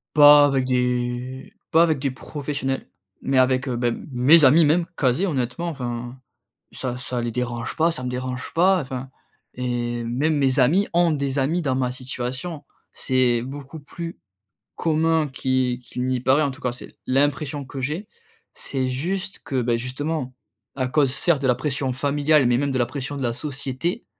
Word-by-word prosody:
Pas 145 -1 +9
avec 135 -2 +1
des 125 0 -2 0.2
pas 165 +1 +6
avec 160 -5 +1
des 140 - 0
professionnels, 135 0 -4 0.3
mais 135 -1 0
avec, 130 +1 +3
heu, 125 - -1
beh, 120 0 0 0.2
mes 145 +6 +6
amis, 150 +6 +7
même, 165 +3 +3
quasi 135 +6 +1
honnêtement, 135 0 -2
enfin, 120 -4 -5 0.5
ça 125 -2 -4
ça 125 0 -4
les 120 0 -2
dérange 120 -1 -3
pas, 165 +2 +3
ça 130 - -4
me - - -2
dérange 125 +1 -5
pas, 185 +2 +4
enfin 130 0 -6 0.5
et 120 -1 -2
même 145 +7 0
mes 135 0 +2
amis 180 +11 +3
ont 175 -1 +4
des 140 -2 -1
amis 160 +7 +1
dans 135 -4 0
ma 125 -1 0
situation. 130 +5 -5 0.3
C'est 125 -3 +2
beaucoup 140 +3 -8
plus 165 +4 -7 0.6
commun 160 -1 +1
qui 130 -2 0
qu'il 125 - -5
n'y 130 -1 0
paraît, 135 +5 +3
en 140 - 0
tout 140 +2 -12
cas, 125 -1 -1
c'est 125 - -12
l'impression 140 +1 0
que 130 0 -7
j'ai. 160 +10 -3 0.5
C'est 130 -2 -3
juste 185 +9 -2
que, 130 -2 -1
beh, 120 0 +1
justement, 130 +1 -3 0.4
à 130 -2 -1
cause, 140 -1 +2
certes, 150 -1 +2
de 135 - +1
la 125 - +4
pression 135 -1 -2
familiale, 145 +2 +2
mais 120 0 +3
même 140 0 0
de 130 - -1
la 120 - +3
pression 140 0 -5
de 135 - -4
la 120 - 0
société, 145 - -4
135 Hz, 180 wpm, -23 LUFS, 125-150 Hz, 0.6 s, Pas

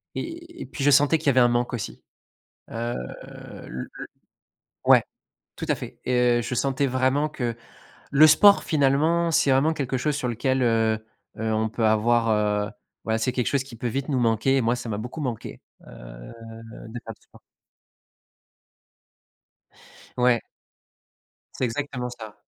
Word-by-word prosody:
Et 340 0 -7
et - - -5
puis 140 - -6
je 145 - +5
sentais 145 +3 +5
qu'il 155 - -7
y - - +7
avait 130 -1 +4
un 120 - +6
manque 120 0 0
aussi. 115 - -5 0.7
Heu, 115 +1 -3 0.7
le 65 0 -6
le - - -8 0.8
ouais, - - +7 0.5
tout - - -5
à - - +3
fait! - - -9
Et 125 -1 +2
heu, - - -1
je 125 - -4
sentais 135 +2 0
vraiment 130 +3 +1
que 120 -5 -4 0.5
le 150 +2 +7
sport, 200 +7 +6
finalement, 155 +4 +2
c'est 145 - +3
vraiment 135 +4 +3
quelque 135 -4 -2
chose 150 +1 -1
sur 125 -4 -2
lequel, 130 +3 0
heu 115 -2 +2 0.4
heu, 110 0 -1
on 110 0 0
peut 110 +1 -3
avoir 115 +1 +2 0.4
heu, - - -9 0.3
ouais, 110 0 0
c'est 125 +3 -1
quelque 125 -2 -1
chose 135 -1 0
qui 125 -4 -12
peut 120 - -5
vite 135 +4 -3
nous 135 -3 0
manquer. 115 +4 +2
Et - - +3
moi, 120 +2 +1
ça 120 -1 -7
m'a 105 -1 -3
beaucoup 125 +8 -6
manqué. 125 -6 -5 0.3
Heu, - - -11 0.6
de 120 +2 -7
faire 115 - -7
du - - -35
sport. - - -20 2.8
Ouais. 125 -1 +3 1.1
C'est 130 - -1
exactement 125 0 -3
ça. 110 -3 -10
125 Hz, 170 wpm, -24 LUFS, 115-140 Hz, 2.8 s, y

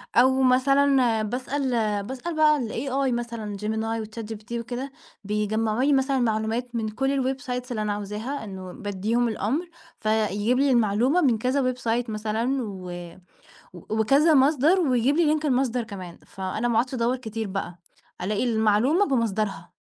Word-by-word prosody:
أو 260 +2 +5
مثلًا 260 -2 +3
باسأل 260 +4 -2 0.3
باسأل 265 +9 -5
بقى 305 -1 +5
الAI 260 +3 -1
مثلًا 235 -4 -4
Gemini 220 +1 -2
وChatGPT 220 0 -8
وكده 245 +3 -5 0.3
بيجمّعوا 215 +3 0
لي 285 +1 +3
مثلًا 270 0 +2
معلومات 230 +1 -1
من 220 -2 -1
كل 270 +3 0
الwebsites 250 -2 -4
اللي 215 -3 -2
أنا 210 -1 -1
عاوزاها 210 +7 -4
إنه 190 -3 -7
بادّيهم 210 +4 -1
الأمر 240 - -2 0.3
ف - - -26
يجيب 215 +3 +1
لي 280 -1 +3
المعلومة 240 - +3
من 245 -6 +3
كذا 255 +2 +1
website 240 -1 -2
مثلًا 225 +5 -1
و 190 -4 -7 0.8
و 180 - -11
وكذا 275 +9 +4
مصدر 295 +6 +4
ويجيب 265 -3 +2
لي 310 -2 +3
link 305 - -9
المصدر 255 -3 +1
كمان 185 -5 -9
فأنا 195 +5 -3
ما 235 - 0
أقعُدش 250 +4 +1
أدوّر 245 +1 +1
كتير 225 -3 -5
بقى 190 -2 -5 0.4
ألاقي 205 +5 0
المعلومة 230 - +3
بمصدرها. 215 - -1
235 Hz, 150 wpm, -25 LUFS, 215-265 Hz, 0.8 s, أو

